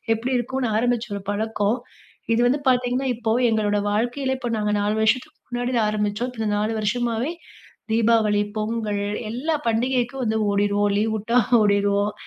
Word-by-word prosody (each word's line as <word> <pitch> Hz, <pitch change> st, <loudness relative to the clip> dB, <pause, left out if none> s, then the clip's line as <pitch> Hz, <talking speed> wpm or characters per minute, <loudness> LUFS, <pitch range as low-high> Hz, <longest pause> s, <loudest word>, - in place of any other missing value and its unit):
எப்டி 240 Hz, +4 st, -4 dB
இருக்குனு 250 Hz, 0 st, -2 dB
ஆரம்பிச்ச 240 Hz, 0 st, 0 dB
ஒரு 200 Hz, -, -5 dB
பழக்கம், 215 Hz, +1 st, 0 dB, 0.6 s
இது 230 Hz, -, +2 dB
வந்து 275 Hz, +4 st, +1 dB
பார்த்தீங்கன்னா 250 Hz, +1 st, +1 dB
இப்போ 225 Hz, -1 st, -2 dB, 0.2 s
எங்களோட 210 Hz, -2 st, +1 dB
வாழ்க்கையிலே, 245 Hz, +5 st, 0 dB
இப்போ 240 Hz, -, -3 dB
நாங்க 210 Hz, -1 st, 0 dB
4 210 Hz, +1 st, 0 dB
வருஷத்துக்கு 225 Hz, +3 st, 0 dB
முன்னாடி 245 Hz, 0 st, -1 dB
ஆரம்பிச்சோம். 210 Hz, +3 st, -1 dB
இப்போ 230 Hz, -, -7 dB
இந்த 210 Hz, -, 0 dB
4 215 Hz, +2 st, 0 dB
வருஷமாவே, 240 Hz, +5 st, -1 dB, 0.6 s
தீபாவளி, 225 Hz, -2 st, +3 dB, 0.2 s
பொங்கல் 215 Hz, -2 st, -2 dB, 0.3 s
எல்லா 305 Hz, +7 st, -1 dB
பண்டிகைக்கும் 250 Hz, +2 st, 0 dB
வந்து 220 Hz, 0 st, 0 dB
ஓடிருவோம். 205 Hz, 0 st, +1 dB
லீவ் 220 Hz, 0 st, 0 dB
உட்டா 230 Hz, +4 st, +2 dB, 0.2 s
ஓடிருவோம், 200 Hz, 0 st, +2 dB
225 Hz, 145 wpm, -23 LUFS, 210-245 Hz, 0.6 s, தீபாவளி